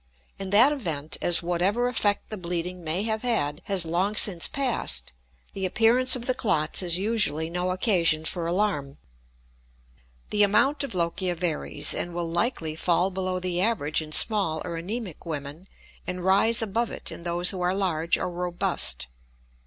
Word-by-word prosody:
In 195 Hz, -1 st, -4 dB
that 230 Hz, +8 st, +5 dB
event, 160 Hz, -, -3 dB
as 175 Hz, 0 st, +4 dB
whatever 185 Hz, +8 st, 0 dB
effect 210 Hz, -5 st, -1 dB
the -, -, -3 dB
bleeding 180 Hz, 0 st, -4 dB
may 165 Hz, +5 st, -1 dB
have 220 Hz, -1 st, -2 dB
had 175 Hz, -11 st, -1 dB
has 190 Hz, -4 st, +1 dB
long 180 Hz, +6 st, -1 dB
since 185 Hz, -5 st, +4 dB
passed, 240 Hz, -, -2 dB, 0.4 s
the 195 Hz, -, -6 dB
appearance 230 Hz, +7 st, +4 dB
of 245 Hz, -1 st, -6 dB
the 255 Hz, -, +1 dB
clots 170 Hz, -11 st, +2 dB
is 175 Hz, -2 st, +2 dB
usually 185 Hz, -7 st, 0 dB
no 180 Hz, +1 st, -2 dB
occasion 180 Hz, -5 st, +1 dB
for 170 Hz, 0 st, -1 dB
alarm. 170 Hz, -7 st, -1 dB, 1.3 s
The 210 Hz, -, +1 dB
amount 270 Hz, +8 st, +3 dB
of 275 Hz, -, -4 dB
lochia 175 Hz, +1 st, -1 dB
varies, 165 Hz, -2 st, -1 dB
and 175 Hz, -1 st, -4 dB
will 175 Hz, -1 st, -3 dB
likely 165 Hz, -2 st, -1 dB
fall 175 Hz, +3 st, +1 dB
below 185 Hz, 0 st, -3 dB
the 180 Hz, -1 st, -2 dB
average 175 Hz, -9 st, 0 dB
in 155 Hz, -1 st, -9 dB
small 190 Hz, -3 st, +3 dB
or 170 Hz, -2 st, -5 dB
anemic 190 Hz, +1 st, -5 dB
women 150 Hz, +3 st, -6 dB, 0.4 s
and 180 Hz, 0 st, -4 dB
rise 220 Hz, +5 st, +4 dB
above 225 Hz, +2 st, -1 dB
it -, -, -5 dB
in -, -, -9 dB
those 175 Hz, +1 st, +1 dB
who 185 Hz, -2 st, -6 dB
are 180 Hz, +1 st, 0 dB
large 170 Hz, -4 st, 0 dB
or -, -, -4 dB
robust. 175 Hz, -, -1 dB
180 Hz, 165 wpm, -25 LUFS, 165-210 Hz, 1.3 s, that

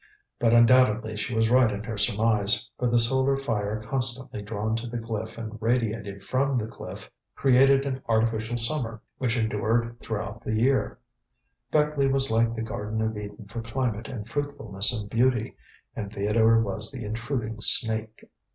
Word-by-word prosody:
But 115 Hz, -, +3 dB
undoubtedly 115 Hz, -2 st, +4 dB
she 110 Hz, +3 st, -3 dB
was 110 Hz, +1 st, +2 dB
right 125 Hz, -2 st, +5 dB
in 100 Hz, 0 st, -4 dB
her 115 Hz, 0 st, -5 dB
surmise, 105 Hz, +2 st, +2 dB
for 125 Hz, -, +1 dB
the 120 Hz, -, +3 dB
solar 130 Hz, +3 st, +3 dB
fire 110 Hz, -5 st, -2 dB
constantly 125 Hz, -1 st, -3 dB
drawn 105 Hz, +1 st, -2 dB
to 115 Hz, +1 st, -5 dB
the 120 Hz, +1 st, -4 dB
cliff 110 Hz, -1 st, -5 dB
and 110 Hz, -1 st, -7 dB
radiated 110 Hz, -4 st, -1 dB
from 135 Hz, +4 st, 0 dB
the 110 Hz, -, -1 dB
cliff, 110 Hz, -, -9 dB, 0.2 s
created 135 Hz, +1 st, +4 dB
an 130 Hz, -1 st, -3 dB
artificial 115 Hz, +1 st, +1 dB
summer, 115 Hz, -2 st, -2 dB, 0.2 s
which 125 Hz, -1 st, 0 dB
endured 115 Hz, +2 st, 0 dB
throughout 110 Hz, 0 st, -5 dB
the 110 Hz, -, -2 dB
year. 130 Hz, +5 st, +1 dB, 0.7 s
Beckleigh 150 Hz, -2 st, +2 dB
was 135 Hz, -1 st, +2 dB
like 115 Hz, +1 st, +2 dB
the 115 Hz, -, -3 dB
Garden 110 Hz, 0 st, -4 dB
of 110 Hz, 0 st, -1 dB
Eden 105 Hz, +1 st, -8 dB
for 115 Hz, +4 st, -6 dB
climate 115 Hz, -1 st, -2 dB
and 115 Hz, -6 st, -7 dB
fruitfulness 115 Hz, -7 st, -1 dB
and 110 Hz, -4 st, -4 dB
beauty, 120 Hz, +1 st, +1 dB, 0.4 s
and 100 Hz, -2 st, -5 dB
Theodore 110 Hz, +3 st, +3 dB
was 105 Hz, +1 st, -3 dB
the 130 Hz, -4 st, -7 dB
intruding 115 Hz, +1 st, -3 dB
snake. 110 Hz, 0 st, +2 dB
115 Hz, 160 wpm, -26 LUFS, 110-125 Hz, 0.7 s, right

